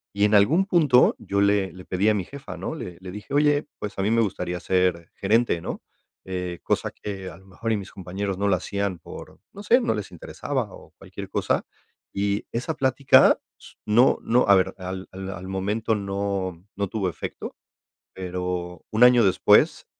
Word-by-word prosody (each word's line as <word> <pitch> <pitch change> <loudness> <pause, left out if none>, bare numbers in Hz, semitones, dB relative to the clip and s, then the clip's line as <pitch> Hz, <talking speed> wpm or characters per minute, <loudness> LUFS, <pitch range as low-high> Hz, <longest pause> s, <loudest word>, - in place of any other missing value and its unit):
Y 100 - +1
en 105 - +2
algún 155 - +4
punto, 150 -10 +4
yo 100 0 -1
le 100 -1 +2
le 90 0 -12
pedí 95 +3 0
a - - +4
mi 95 - -1
jefa, 140 +5 -9
¿no?, - - -4
le 85 -1 -7
le 95 -1 -8
dije: 105 +7 -9
"Oye, 145 0 +3
pues 105 -1 -6
a - - +2
mí 105 - +1
me 115 0 +3
gustaría 90 -4 -2
ser 90 -2 0
gerente." 105 -3 +1
¿no?, - - -5 0.4
eh, 90 -2 -4
cosa - - 0
que 95 -2 -7
a 85 - -12
lo 95 - -19
mejor, 110 +5 -4
y - - +1
mis 100 -1 -8
compañeros 95 +1 -4
no 100 - +1
la 95 - +3
hacían 100 0 -3
por, - - -11
no 200 - -9
sé, 245 +4 +4
no 235 - +1
les 105 - -5
interesaba - - -4
o - - -14
cualquier - - -9
cosa. - - 0 0.5
Y 100 +1 -1
esa 125 +7 -3
plática 135 -1 +5 0.2
s - - -15
no 120 +5 +4
no, 120 +2 +2
a 100 - +7
ver, 95 - +2
al 95 0 -6
al 95 0 -7
al 95 0 -8
momento 105 +4 -1
no 100 -3 -3
no 100 0 -1
tuvo 105 -4 -1
efecto, - - -7 0.6
pero, 90 -1 -4
un 110 +3 +5
año 125 -2 +6
después, 95 - +4
100 Hz, 195 wpm, -24 LUFS, 95-110 Hz, 0.6 s, a